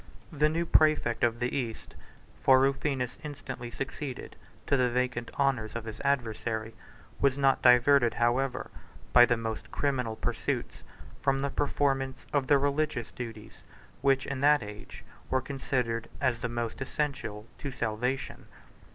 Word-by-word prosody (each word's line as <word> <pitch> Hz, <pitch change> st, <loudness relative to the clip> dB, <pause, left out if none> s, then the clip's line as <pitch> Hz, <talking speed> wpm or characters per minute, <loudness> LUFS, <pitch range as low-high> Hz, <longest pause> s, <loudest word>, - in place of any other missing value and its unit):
8 145 Hz, -, -10 dB
The 150 Hz, 0 st, +5 dB
new 165 Hz, +2 st, -1 dB
præfect 155 Hz, -8 st, +3 dB
of 115 Hz, -1 st, +2 dB
the 125 Hz, 0 st, -1 dB
East 120 Hz, -5 st, -4 dB, 0.5 s
(for 130 Hz, -1 st, +6 dB
Rufinus 135 Hz, -2 st, 0 dB
instantly 145 Hz, -4 st, -6 dB
succeeded 130 Hz, +1 st, -6 dB, 0.3 s
to 140 Hz, -, +2 dB
the 125 Hz, -2 st, +3 dB
vacant 125 Hz, -1 st, -1 dB
honors 130 Hz, -6 st, 0 dB
of 115 Hz, -1 st, -4 dB
his 110 Hz, -1 st, -7 dB
adversary) 115 Hz, -4 st, -1 dB, 0.5 s
was 140 Hz, -1 st, +2 dB
not 135 Hz, -1 st, +3 dB
diverted, 125 Hz, 0 st, +5 dB
however, 125 Hz, +2 st, 0 dB, 0.4 s
by 120 Hz, 0 st, +8 dB
the 120 Hz, -, +2 dB
most 115 Hz, -1 st, -5 dB
criminal 125 Hz, -6 st, -1 dB
pursuits, -, -, -3 dB, 0.4 s
from 135 Hz, 0 st, +2 dB
the 140 Hz, 0 st, -1 dB
performance 135 Hz, -2 st, 0 dB
of 140 Hz, -3 st, +1 dB
the 145 Hz, -, +6 dB
religious 140 Hz, -3 st, -1 dB
duties, 110 Hz, -3 st, -8 dB, 0.4 s
which 135 Hz, -1 st, +3 dB
in 135 Hz, -1 st, -4 dB
that 145 Hz, -1 st, +5 dB
age 105 Hz, 0 st, -10 dB, 0.3 s
were 130 Hz, -, +2 dB
considered 125 Hz, -4 st, -2 dB
as 130 Hz, -4 st, +1 dB
the 125 Hz, -, -3 dB
most 120 Hz, +1 st, -4 dB
essential 130 Hz, -7 st, -3 dB
to 140 Hz, -, -4 dB
salvation. 125 Hz, +2 st, -3 dB
130 Hz, 145 wpm, -29 LUFS, 120-140 Hz, 0.5 s, by